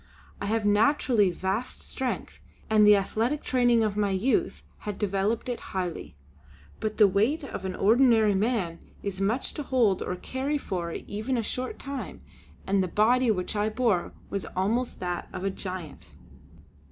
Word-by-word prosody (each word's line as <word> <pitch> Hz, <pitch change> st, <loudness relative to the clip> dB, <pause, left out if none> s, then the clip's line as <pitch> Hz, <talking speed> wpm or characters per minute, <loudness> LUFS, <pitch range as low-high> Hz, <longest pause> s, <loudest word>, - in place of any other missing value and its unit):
I 200 Hz, -, -2 dB
have 220 Hz, 0 st, 0 dB
naturally 215 Hz, -1 st, +3 dB
vast 190 Hz, +7 st, -3 dB
strength 260 Hz, -1 st, -4 dB, 0.3 s
and 210 Hz, -1 st, +6 dB
the 210 Hz, -, +9 dB
athletic 225 Hz, +8 st, 0 dB
training 245 Hz, -3 st, +3 dB
of 210 Hz, -2 st, 0 dB
my 205 Hz, -1 st, +1 dB
youth 265 Hz, -, 0 dB, 0.2 s
had 205 Hz, -2 st, -5 dB
developed 205 Hz, +3 st, 0 dB
it 245 Hz, -1 st, -3 dB, 0.2 s
highly. 180 Hz, -, -4 dB, 0.6 s
But 215 Hz, -1 st, -3 dB
the 210 Hz, -, +7 dB
weight 220 Hz, -, +1 dB
of 200 Hz, -8 st, -6 dB
an 185 Hz, -, -3 dB
ordinary 225 Hz, -1 st, +4 dB
man 195 Hz, -5 st, 0 dB, 0.2 s
is 195 Hz, -1 st, -4 dB
much 220 Hz, +7 st, 0 dB
to -, -, -4 dB
hold 240 Hz, -9 st, +2 dB
or 180 Hz, -, -2 dB
carry 265 Hz, +9 st, -2 dB
for 180 Hz, -10 st, -4 dB
even 220 Hz, +9 st, -3 dB
a 230 Hz, -, 0 dB
short 255 Hz, +4 st, -4 dB
time, 275 Hz, -1 st, -6 dB, 0.4 s
and 195 Hz, 0 st, +2 dB
the 185 Hz, -, 0 dB
body 235 Hz, +6 st, +3 dB
which 185 Hz, -1 st, -1 dB
I 210 Hz, +1 st, +1 dB
bore 220 Hz, -5 st, 0 dB, 0.2 s
was 200 Hz, -1 st, -3 dB
almost 225 Hz, +7 st, 0 dB
that 180 Hz, -1 st, -3 dB
of -, -, -5 dB
a 195 Hz, -, 0 dB
giant. 175 Hz, -, -7 dB
210 Hz, 165 wpm, -27 LUFS, 190-245 Hz, 0.6 s, the